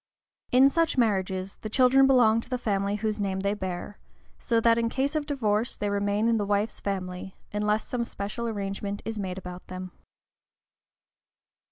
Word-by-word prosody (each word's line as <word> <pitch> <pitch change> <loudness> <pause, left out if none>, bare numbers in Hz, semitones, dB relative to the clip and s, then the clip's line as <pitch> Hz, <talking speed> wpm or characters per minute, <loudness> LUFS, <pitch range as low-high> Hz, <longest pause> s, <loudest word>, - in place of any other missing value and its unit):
In 265 +2 +6
such 330 -2 +1
marriages 190 -4 0
the 215 - -6
children 265 +3 +5
belong 230 -4 +5
to 245 - -13
the 255 - -1
family 200 -3 0
whose 215 0 -2
name 190 -1 -1
they 200 +1 +1
bear, 190 0 -5 0.4
so 230 -1 +1
that 230 0 +4
in 230 0 +1
case 275 +4 -1
of 300 -1 -1
divorce 230 -5 0
they 205 -1 -1
remain 205 +2 +1
in 230 -1 +3
the 205 - 0
wife's 205 +2 0
family, 185 -1 -4 0.2
unless 210 +1 0
some 245 -1 -1
special 230 +1 -4
arrangement 200 -1 -4
is 225 -1 -4
made 185 -2 -3
about 180 -1 -8
them. 185 0 -7
210 Hz, 170 wpm, -27 LUFS, 195-235 Hz, 0.4 s, In